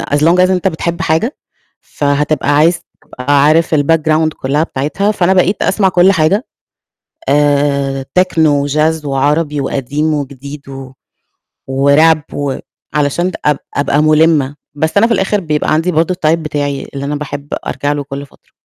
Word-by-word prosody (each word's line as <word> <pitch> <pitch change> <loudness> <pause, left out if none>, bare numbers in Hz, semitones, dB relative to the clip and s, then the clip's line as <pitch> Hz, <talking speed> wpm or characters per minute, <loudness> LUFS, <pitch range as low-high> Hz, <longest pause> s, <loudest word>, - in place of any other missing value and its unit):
as - - +3
long 165 +4 +3
as - - -2
أنت 185 0 +1
بتحب 170 0 -4
حاجة 165 - 0 0.4
فهتبقى 145 0 0
عايز 160 +3 +3 0.2
تبقى 140 +2 0
عارف 160 +2 +3
الbackground 155 +1 +2
كلّها 140 +3 0
بتاعِتها 160 +8 -1
فأنا 190 -3 +1
بقيت 190 +2 +1
أسمع 195 -3 +2
كل 185 +1 +4
حاجة 185 +6 +1 0.8
آآ 140 -1 +1
تِكنو، 160 -6 +2
وچاز، 155 +2 0
وعربي، 145 +2 0
وقديم 145 +4 -2
وجديد 140 0 -6
و 135 -1 -9 0.8
وRap 145 +3 +3
و 140 -2 -3 0.4
علشان 150 +5 0
د - - -7
أب 150 -2 +2 0.2
أبقى 145 +1 +1
مُلِّمة 155 -2 +3 0.2
بس 160 +5 -2
أنا 225 +3 +5
في 235 - +1
الآخر 195 +1 0
بيبقى 155 -3 -1
عندي 165 +4 +1
برضه 165 +3 +1
الtype 155 -3 0
بتاعي 145 -3 -3
اللي 140 0 -4
أنا 145 +1 -2
باحب 145 -1 -6 0.2
أرجع 145 0 -2
له 145 -1 -3
كل 140 0 -7
فترة. - - -27
150 Hz, 155 wpm, -14 LUFS, 140-165 Hz, 0.8 s, أنا